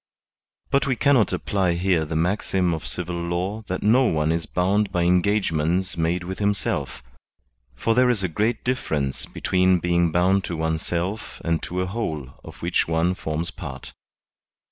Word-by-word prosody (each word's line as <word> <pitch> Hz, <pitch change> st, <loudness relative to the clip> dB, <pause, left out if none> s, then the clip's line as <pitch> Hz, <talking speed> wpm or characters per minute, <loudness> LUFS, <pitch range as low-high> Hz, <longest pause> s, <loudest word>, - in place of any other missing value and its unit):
But 140 Hz, 0 st, +2 dB
we 130 Hz, -, +1 dB
cannot 130 Hz, -6 st, +3 dB
apply 95 Hz, 0 st, 0 dB
here 85 Hz, -2 st, +1 dB
the 80 Hz, +1 st, -4 dB
maxim 90 Hz, +1 st, +1 dB
of 80 Hz, -, -4 dB
civil 90 Hz, -1 st, -3 dB
law 90 Hz, +5 st, -2 dB
that 95 Hz, -, -3 dB
no 120 Hz, +5 st, +5 dB
one 75 Hz, -6 st, +1 dB
is 80 Hz, 0 st, -1 dB
bound 95 Hz, +3 st, +1 dB
by 90 Hz, -2 st, +1 dB
engagements 90 Hz, -1 st, +1 dB
made 85 Hz, +2 st, 0 dB
with 95 Hz, +2 st, -6 dB
himself; 100 Hz, -, -1 dB, 0.7 s
for 115 Hz, -, +1 dB
there 125 Hz, +2 st, +4 dB
is 110 Hz, -6 st, +1 dB
a -, -, +2 dB
great 105 Hz, +7 st, -1 dB
difference 75 Hz, -, -1 dB
between 95 Hz, 0 st, +2 dB
being 85 Hz, -1 st, +1 dB
bound 95 Hz, +3 st, +3 dB
to 85 Hz, -, -4 dB
oneself 85 Hz, +5 st, -2 dB
and 85 Hz, -1 st, +1 dB
to 90 Hz, +1 st, -3 dB
a -, -, 0 dB
whole 80 Hz, -, -3 dB
of -, -, -12 dB
which -, -, +1 dB
one 85 Hz, +2 st, +1 dB
forms 80 Hz, -1 st, -3 dB
part. 65 Hz, -5 st, -8 dB
90 Hz, 165 wpm, -24 LUFS, 85-100 Hz, 0.7 s, no